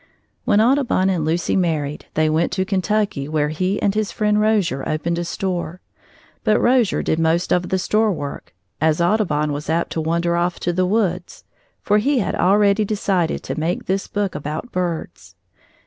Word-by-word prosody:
When 210 -4 +3
Audubon 235 -5 +2
and 175 -4 -1
Lucy 165 +3 0
married, 155 -5 -1
they 155 0 +2
went 160 +2 +1
to 190 0 0
Kentucky, 195 -5 -1
where 150 -1 0
he 185 +6 -1
and 200 - +2
his 215 -1 -1
friend 210 0 +1
Rozier 200 -11 +1
opened 170 +2 -1
a - - -1
store. 175 -2 -3 0.6
But 215 - +3
Rozier 245 -4 +2
did 160 - 0
most 165 +2 +1
of 180 0 0
the 190 - +1
store 215 +3 +1
work, 145 - -6 0.3
as 155 0 +2
Audubon 170 -5 +1
was 145 +1 -5
apt 165 +1 0
to 160 - -2
wander 170 +2 0
off 175 +1 -1
to 175 - 0
the 185 +1 +1
woods, 185 -4 -1 0.4
for 210 +1 +3
he 275 +6 +1
had 215 - 0
already 200 +2 +3
decided 195 -5 -1
to - - -4
make 165 +3 -2
this 195 +1 -1
book 205 -2 -2
about 150 - -5
birds. 175 -3 -4
180 Hz, 180 wpm, -20 LUFS, 160-205 Hz, 0.6 s, When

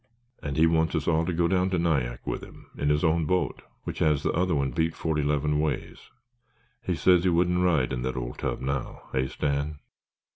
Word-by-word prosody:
"And 70 -1 -4
he 80 - +6
wants 80 0 +2
us 75 -2 -1
all 80 0 +2
to - - +1
go 85 0 +2
down 95 +1 +2
to 95 - 0
Nyack 70 -8 0
with - - -3
him - - -14
in 75 - 0
his 75 +2 +2
own 80 -1 +2
boat 90 -5 0 0.2
which - - -5
has 75 -3 +2
the - - +1
other 90 0 +1
one 70 -2 0
beat 80 +3 0
forty 80 -2 -1
'leven 75 +1 +1
ways. 75 0 -2 0.8
He 90 - -1
says 90 +1 +4
he 95 - +3
wouldn't 90 +1 +2
ride 80 -8 +2
in 60 - -2
that 65 +1 -3
old - - -5
tub - - -2
now, 70 -1 -3
hey, 65 0 0
Stan? 70 +2 -2
80 Hz, 215 wpm, -27 LUFS, 70-85 Hz, 0.8 s, he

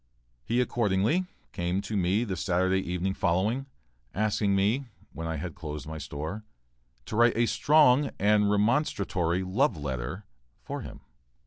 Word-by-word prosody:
He 120 - 0
accordingly 120 - +1 0.2
came 90 +1 -1
to 110 - -5
me 95 +4 +2
the 100 -5 -3
Saturday 95 +1 +1
evening 90 +1 -2
following, 105 +11 0 0.5
asking 105 -1 +1
me, 110 +8 +1 0.3
when 80 0 -5
I 80 - -2
had 80 +2 -5
closed 75 -2 -7
my 80 0 -6
store, 80 +9 -5 0.6
to - - -5
write 120 0 +4
a 120 - +4
strong 145 +1 +4
and 105 +1 +3
remonstratory 100 - +1
"love 110 - +1
letter" 70 - -4 0.4
for - - -5
him. - - -9
100 Hz, 140 wpm, -28 LUFS, 85-115 Hz, 0.6 s, write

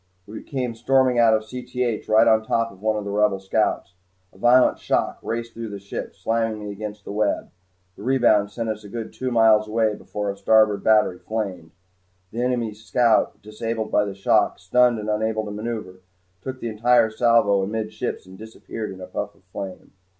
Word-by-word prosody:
We 105 +2 -9
came 125 -4 -3
storming 125 +1 +2
out 115 -1 +6
of 110 - -1
Cth 125 0 -4
right 110 +1 +5
on 110 0 +5
top 115 +1 0
of 95 - -17
one 110 0 +1
of 105 - -3
the 100 - -4
Rebel 105 -1 +2
scouts. 95 -1 -1 0.4
A - - -19
violent 125 +3 +4
shock - - -1
raced 115 0 -4
through 115 -1 -6
the 100 - -6
ship, 100 0 -7
slamming 115 -1 -1
me 105 -1 -6
against 105 0 -7
my - - -6
web. 105 -1 -1 0.4
The - - -13
rebound 115 -4 +3
sent 115 +2 -4
us 110 -1 -4
a 100 - -11
good 115 +1 -6
two 130 - -3
miles 110 -2 +4
away 110 0 +1
before 105 0 -5
our - - -8
starboard 110 -1 +3
battery 105 -4 +3
flamed. 95 -7 -4 0.6
The 115 - -3
enemy 120 -3 -1
scout, 110 +1 +1
disabled 110 +1 -4
by 105 - +3
the 100 -1 -5
shock, 100 - +2
stunned 120 +6 +3
and 105 0 -5
unable 110 0 -1
to 105 - -6
maneuver 105 -3 -5 0.4
took 130 +4 -6
the 115 - -4
entire 110 +1 +3
salvo 115 -4 +3
amidships 110 +3 -4
and 95 0 -14
disappeared 110 0 -7
in 95 -1 -10
a - - -6
puff - - -5
of - - -28
flame. 95 -2 -7
110 Hz, 195 wpm, -23 LUFS, 105-115 Hz, 0.6 s, out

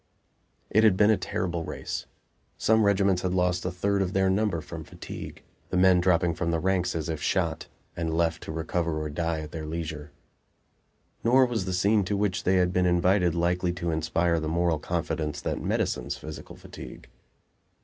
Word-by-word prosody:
It 110 - +4
had 105 -4 +5
been 105 +1 +5
a - - +5
terrible 85 -3 -3
race; - - -5 0.5
some 110 0 +3
regiments 100 -2 +3
had 90 0 -1
lost 90 -1 +1
a - - 0
third 100 +2 0
of 95 0 -1
their 95 -1 +3
number 100 -3 +1
from 75 - -8
fatigue, - - -9 0.3
the 95 - -1
men 90 -1 +5
dropping 85 -1 +3
from 85 +1 -2
the 85 -1 +1
ranks 90 0 0
as 80 -2 -2
if 80 -2 -3
shot, 85 -4 -1 0.3
and 85 -1 -2
left 80 0 0
to - - -6
recover 80 0 -2
or 75 -1 -4
die 80 +1 -1
at 75 0 -8
their 80 -2 -6
leisure. 75 -2 -5 1.1
Nor 130 +3 +5
was 115 -6 -2
the 95 - -3
scene 100 +3 +3
to 100 +2 -1
which 95 -3 -1
they 95 - +3
had 90 -1 +2
been 90 0 +2
invited 90 0 +3
likely 90 +1 +1
to 85 -1 -2
inspire 85 +1 +1
the 80 - -3
moral 85 -1 +1
confidence 80 -2 -2
that - - -3
medicines - - -1
physical 75 0 -9
fatigue. - - -11
90 Hz, 185 wpm, -27 LUFS, 80-95 Hz, 1.1 s, had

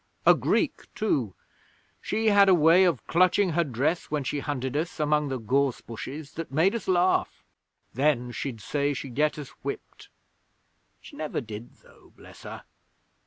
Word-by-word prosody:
A - - +8
Greek, - - -1
too. 130 - -1 0.7
She 220 0 0
had 200 -1 +6
a 185 - +7
way 170 +3 +6
of 175 - 0
clutching 185 +2 +3
her 170 +2 +2
dress 145 +5 -1
when 150 -2 -1
she 145 +2 -2
hunted 135 -2 -3
us 160 +3 -2
among 150 0 +1
the 130 - -2
gorse 130 +3 0
bushes 140 +5 -8
that 165 -3 -6
made 160 +8 +3
us 235 - -4
laugh. 185 0 +1 0.5
Then 130 -2 +1
she'd 120 -2 -5
say 145 +4 -1
she'd 130 -1 -6
get 150 +4 +1
us 145 -2 -7
whipped. 140 - -7 0.9
She - - -13
never 155 -1 -3
did, 110 -1 -9
though, - - -21
bless - - -15
her! - - -9
150 Hz, 165 wpm, -26 LUFS, 130-170 Hz, 0.9 s, A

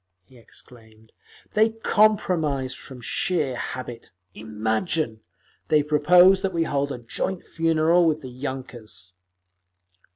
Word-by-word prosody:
he 125 - -22
exclaimed. 110 -1 -15 0.4
"They 215 +1 +4
compromise 180 -12 +1
from 130 -1 -10
sheer 150 +1 0
habit. 120 -1 -6 0.2
Imagine! 110 - -2 0.5
They 150 -1 +3
proposed 175 +6 +5
that 195 -2 -2
we 165 -1 +1
hold 140 -2 -1
a 130 - -4
joint 125 +10 -4
funeral 165 +1 +2
with 155 -1 0
the 130 -3 -9
_yunkers!" 120 -8 -6
145 Hz, 110 wpm, -24 LUFS, 120-170 Hz, 0.5 s, proposed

